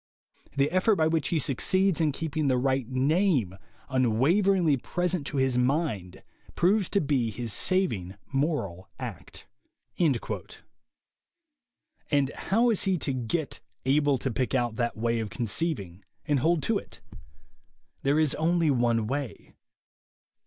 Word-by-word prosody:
The 140 +2 +2
effort 185 +4 +3
by 160 - +2
which 160 -2 +1
he 170 - 0
succeeds 180 +6 +1
in 155 -2 +2
keeping 155 0 -2
the 130 -2 +3
right 130 -1 0
name 135 - +1 0.3
unwaveringly 145 - +2
present 175 +2 -2
to 145 - -3
his 130 -2 +2
mind 125 - -1 0.3
proves 195 +2 +2
to 200 - +2
be 135 -7 0
his 115 0 -4
saving 110 - 0 0.2
moral 135 - -1
act." - - -8 0.5
And 160 -7 +3 2.2
how 230 +4 +1
is 215 - +1
he 190 -2 +2
to 140 -4 -1
get 130 +5 -2 0.3
"able 145 +1 +3
to 130 +1 -3
pick 130 +3 -1
out 120 -3 0
that 120 -2 -1
way 115 +1 0
of 110 -2 -3
conceiving" 105 - -2 0.2
and 145 -2 +1
hold 160 +2 +1
to 225 -3 +1
it? - - -14 1.0
There 140 +2 +2
is 155 -3 +2
only 165 -1 +2
one 120 -3 +1
way. 130 -3 -5
140 Hz, 135 wpm, -27 LUFS, 120-170 Hz, 2.2 s, effort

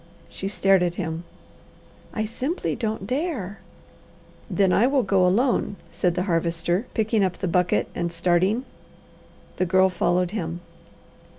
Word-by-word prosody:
She 195 - -5
stared 195 -2 +3
at 175 -1 0
him. 165 -2 -4 0.9
"I 215 - -2
simply 265 - -2
don't 220 -4 -3
dare." 250 - -3 0.9
"Then 195 -2 +2
I 235 - +4
will 270 -1 +2
go 195 -1 +3
alone," 225 +1 +1 0.2
said 175 -2 0
the 180 - 0
Harvester, 175 +3 0
picking 220 -2 +2
up 185 -2 0
the 190 - -2
bucket 180 +1 +2
and 170 -1 -2
starting. 180 +8 +1 0.9
The 185 - +1
Girl 190 +1 +4
followed 180 -1 +1
him. 175 -5 -4
190 Hz, 135 wpm, -24 LUFS, 175-220 Hz, 0.9 s, I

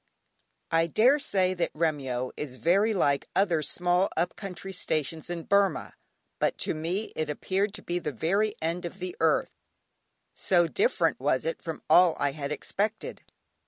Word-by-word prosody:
(Gray.) 165 - +3
I 165 - +2
daresay 210 - +3
that 175 -2 -1
Remyo 135 -6 -1
is 135 -4 -6
very 195 - +3
like 145 -9 +1
other 175 -5 +2
small 180 +4 +2
up 175 +2 0
country 195 -1 -7
stations 160 -2 -2
in 170 -1 -4
Burmah, 200 -4 +1 0.5
but - - +1
to - - 0
me 170 +7 -3
it 155 -1 -2
appeared 195 +7 -1
to - - -8
be 175 0 -2
the 155 -3 -3
very 195 - 0
end 170 +2 -2
of 175 +2 -7
the 185 -1 -5
earth, 160 -2 +2 0.8
so 175 -2 +2
different 435 - +1
was - - 0
it - - -3
from - - -6
all 180 -2 +6
I 140 - +1
had 140 0 -5
expected. 210 +8 -3
175 Hz, 160 wpm, -27 LUFS, 155-195 Hz, 0.8 s, all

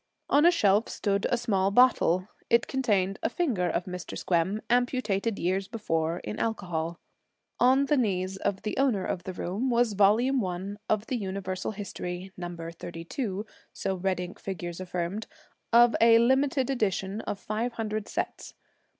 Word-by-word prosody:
On 295 +4 +6
a - - +7
shelf 210 - +3
stood 200 -1 0
a 245 - +2
small 200 -5 +1
bottle. 200 -5 +4 0.2
It 235 0 +4
contained 205 -7 0
a - - +1
finger 240 - 0
of 175 - -1
Mr. 180 -1 -6
Squem, 185 +4 +1
amputated 235 -4 +1
years 190 +2 0
before, 165 -7 -1
in - - -5
alcohol. 175 -7 -2 0.6
On 260 +3 +5
the 295 +1 +2
knees 190 -5 0
of 195 0 -2
the 210 - -2
owner 250 -8 +2
of 175 - -3
the 185 - -4
room 200 +9 -2
was 240 -2 +2
Volume 225 +7 +4
One 190 +2 -4
of 215 0 +1
the 255 - -2
Universal 190 -1 -3
History 190 -2 -6
Number 175 -2 -6
32, 175 +6 -5 0.3
so 195 - -2
red 185 0 -1
ink 180 0 -6
figures 175 -3 -5
affirmed, 180 +3 -3 0.4
of 240 0 +6
a 230 0 +7
limited 265 +2 +2
edition 205 -4 -1
of 205 - -2
five 220 +4 -3
hundred 215 -1 -3
sets. - - -4
200 Hz, 160 wpm, -28 LUFS, 185-235 Hz, 0.6 s, a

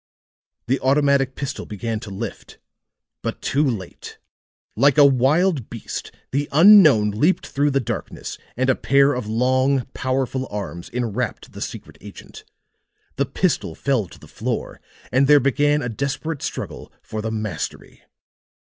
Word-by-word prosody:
The 135 +3 0
automatic 140 -1 +2
pistol 140 - -5
began 110 +2 -4
to 110 - -9
lift 100 +2 -7 0.6
but - - -4
too 140 +2 0
late. 110 - -4 0.6
Like 140 +5 +4
a 145 - +8
wild 140 - +2
beast 115 - -6 0.2
the 145 +2 -1
unknown 155 - +7
leaped 150 - +1
through 145 +1 0
the 135 -1 +1
darkness, 125 - -5 0.2
and 130 +1 +1
a 130 - +5
pair 140 +2 +3
of 125 -5 -4
long 130 +3 +1
powerful 130 0 -2
arms 95 -4 -6
enwrapped 120 -1 -3
the - - -10
secret - - -7
agent. - - -12 0.7
The 140 0 +1
pistol 140 - -1
fell 130 -8 0
to - - -15
the - - -15
floor, - - -4 0.3
and 130 +2 +3
there 145 0 +7
began 145 +2 +2
a - - -2
desperate 140 +5 -3
struggle - - -6
for 110 - -5
the 110 - -3
mastery. 110 -7 -5
130 Hz, 145 wpm, -22 LUFS, 115-140 Hz, 0.7 s, a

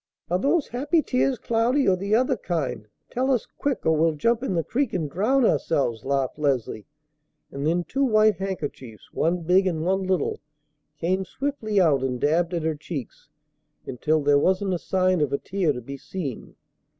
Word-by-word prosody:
"Are 180 - +2
those 290 - +1
happy 290 +7 +1
tears, 255 0 +1
Cloudy, 235 +5 +1
or 190 - +5
the 200 +3 0
other 255 +3 +2
kind? 135 - -3 0.2
Tell 260 +2 0
us 255 -5 +1
quick, 285 -3 -1
or 160 0 +4
we'll 160 0 +2
jump 230 +10 +1
in 225 -9 -2
the 165 - +1
creek 265 - -1
and 165 -5 -1
drown 225 - +2
ourselves," 120 - 0
laughed 135 +1 -1
Leslie; 130 -7 -1 0.6
and 140 +2 -3
then 175 +2 +1
two 270 +9 -1
white 215 -4 +4
handkerchiefs, 145 - -6
one 170 +2 0
big 185 +3 +3
and 160 -3 -1
one 190 +2 +1
little, 185 -4 -1 0.6
came 185 +4 0
swiftly 220 -3 -2
out 155 -7 +4
and 130 -2 -2
dabbed 165 +5 +1
at 165 - -2
her 160 0 0
cheeks 145 -4 -8 0.6
until 155 +5 0
there 145 0 +4
wasn't 190 +4 +1
a 175 - -1
sign 185 -2 +1
of 145 -2 +1
a 140 - +1
tear 185 -2 0
to 125 -3 -5
be 140 +4 -8
seen. 145 - -6
180 Hz, 185 wpm, -24 LUFS, 145-215 Hz, 0.6 s, or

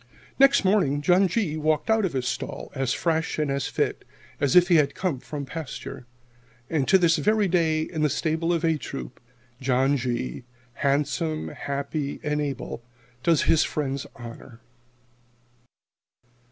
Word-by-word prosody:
_" - - -26 0.4
Next 275 -5 +5
morning 185 -8 +3
John 180 +5 +4
G. 180 -5 -1
walked 155 -1 0
out 220 -2 +3
of 180 - -2
his 130 -2 -1
stall - - -4
as 135 -3 -1
fresh 160 +3 0
and 150 -2 0
as 140 -1 -1
fit - - -1 0.4
as 145 +1 +1
if 180 -1 +7
he 175 -3 +5
had 145 -2 +2
come 175 -9 -1
from 145 +1 -6
pasture. 140 -4 -7 0.6
And 150 -5 +1
to 190 - +6
this 170 -3 +3
very 215 -1 +2
day, 165 -3 +2
in 160 -1 -4
the 150 - +3
stable 160 +3 0
of 170 -1 +1
"A" 160 -2 +2
Troop, 135 - -7 0.4
John 135 +2 +2
G., 120 - -3 0.4
handsome, 145 +2 0
happy, 140 +1 -4
and 150 0 0
able, 140 -4 -4 0.4
does 165 +2 +3
his 160 - +4
friends 140 -2 -3
honor. 115 0 -11
150 Hz, 155 wpm, -25 LUFS, 140-170 Hz, 0.6 s, if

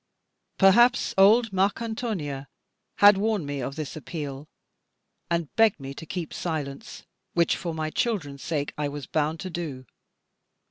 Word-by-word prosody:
Perhaps 240 +6 +5
old 210 +3 +5
Marcantonia 195 - -1 0.5
had 205 -1 +7
warned 210 -5 0
me 145 -1 -4
of 135 +2 -4
this 155 -3 -5
appeal, 150 -2 -6 0.8
and 170 -3 -2
begged 225 -6 +4
me 135 0 -7
to 160 +3 -10
keep 175 -3 -5
silence, 145 -5 -5 0.3
which 170 -1 +3
for 170 -3 -4
my 155 -1 -3
children's 155 - -2
sake 150 -4 -2
I 150 - 0
was 145 -1 -6
bound 155 +3 -1
to 185 -1 -5
do. 150 -7 -5
165 Hz, 140 wpm, -26 LUFS, 145-195 Hz, 0.8 s, had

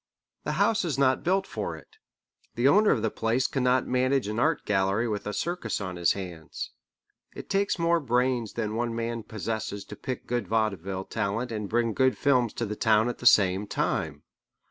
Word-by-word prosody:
The - - -1
house 220 -1 +2
is 155 -7 -2
not 130 -1 +2
built 190 +2 +2
for 100 - -4
it. 75 - -17 0.6
The 120 +3 +3
owner 210 +9 +5
of - - +2
the 110 - +1
place 115 +3 0
cannot 130 -1 +2
manage 130 -1 +1
an 105 +2 -2
art 155 +4 +1
gallery 100 +3 +1
with 105 -2 -3
a - - -1
circus 175 - -2
on 95 -3 -5
his 85 -1 +2
hands. 90 -5 -7 0.6
It - - -8
takes 200 0 +1
more 170 0 +2
brains 125 -4 0
than 110 -2 -2
one 115 0 -2
man 115 0 -2
possesses 110 -2 -4
to - - -9
pick 130 -1 -5
good 120 -5 -2
vaudeville 100 -3 -1
talent 115 +5 -2
and 105 -3 -4
bring 115 -1 +1
good 130 +1 +2
films 125 -5 +2
to 115 - -2
the 105 0 -4
town 110 +2 +3
at 120 - -5
the 125 - +2
same 100 -2 +4
time. - - -2
115 Hz, 190 wpm, -27 LUFS, 105-130 Hz, 0.6 s, owner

